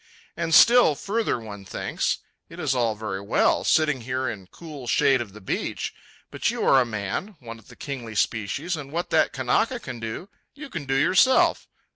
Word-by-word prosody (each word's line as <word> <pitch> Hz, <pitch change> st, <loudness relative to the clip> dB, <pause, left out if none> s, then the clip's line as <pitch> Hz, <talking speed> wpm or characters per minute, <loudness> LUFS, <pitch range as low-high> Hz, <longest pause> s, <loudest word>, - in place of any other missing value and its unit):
And 165 Hz, -, -3 dB
still 240 Hz, -10 st, +7 dB
further 215 Hz, -, -1 dB
one 105 Hz, -3 st, -9 dB
thinks. 95 Hz, -, -2 dB, 0.3 s
It 165 Hz, -, -11 dB
is 145 Hz, -6 st, 0 dB
all 115 Hz, -4 st, +1 dB
very 105 Hz, -3 st, -5 dB
well, 100 Hz, -, +2 dB
sitting 150 Hz, -5 st, +2 dB
here 130 Hz, +2 st, -2 dB
in 95 Hz, -6 st, -6 dB
cool 150 Hz, -, -10 dB
shade 135 Hz, +1 st, +3 dB
of 100 Hz, -5 st, -7 dB
the 105 Hz, -, -11 dB
beach, 95 Hz, -, -3 dB, 0.4 s
but -, -, 0 dB
you -, -, -2 dB
are 135 Hz, -, +6 dB
a -, -, +1 dB
man, 110 Hz, -, -4 dB
one 115 Hz, -2 st, -9 dB
of 110 Hz, -, -21 dB
the -, -, -14 dB
kingly 125 Hz, -6 st, -7 dB
species, 130 Hz, -, -1 dB
and 140 Hz, -3 st, -8 dB
what 170 Hz, +3 st, -3 dB
that -, -, +3 dB
Kanaka -, -, 0 dB
can 125 Hz, -2 st, -7 dB
do, 115 Hz, -, -6 dB, 0.3 s
you 290 Hz, 0 st, -10 dB
can 160 Hz, -5 st, -5 dB
do 135 Hz, 0 st, -1 dB
yourself. 190 Hz, -, +4 dB
130 Hz, 190 wpm, -24 LUFS, 110-165 Hz, 0.4 s, still